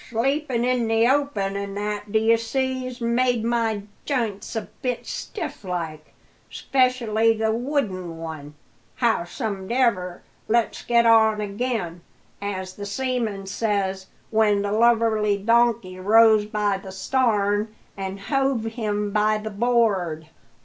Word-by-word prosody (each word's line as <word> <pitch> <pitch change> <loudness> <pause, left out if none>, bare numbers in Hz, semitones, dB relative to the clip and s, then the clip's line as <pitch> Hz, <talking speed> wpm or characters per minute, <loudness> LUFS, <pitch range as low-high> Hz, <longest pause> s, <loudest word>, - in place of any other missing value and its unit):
"Sleepin' 255 +1 0
in 250 -2 +1
the 225 +1 +3
open 255 -8 0
an' 200 0 -4
that, 210 0 -4
d'ye 220 +1 +4
see, 260 +2 -2
's 250 0 -10
made 235 0 +1
my 225 -3 0 0.2
jints 230 -7 -2
a 220 - -1 0.2
bit 250 -3 -2
stiff 360 - -6
like 165 -4 -5 0.3
'specially 230 -4 +1
the 220 0 +1
wooden 220 - -2
one! 155 -3 -8 0.4
Howsomedever, 205 -2 0 0.2
let's 230 0 +1
get 235 -1 +3
on 220 -2 +5
again 205 -4 -3 0.4
as 190 -2 -4
the 205 - -5
seaman 225 -3 -2
says 195 -2 -1 0.2
when 210 -2 +3
the 200 - -2
lubberly 220 -2 +3
donkey 230 -3 +2
rose 215 +2 +5
by 210 -2 0
the 195 -1 -9
starn 210 0 0 0.2
an' 195 0 -5
hove 270 +3 0
him 210 -2 -2
by 215 +1 +2
the 215 0 -6
board." 200 -8 +1
220 Hz, 125 wpm, -23 LUFS, 200-235 Hz, 0.4 s, on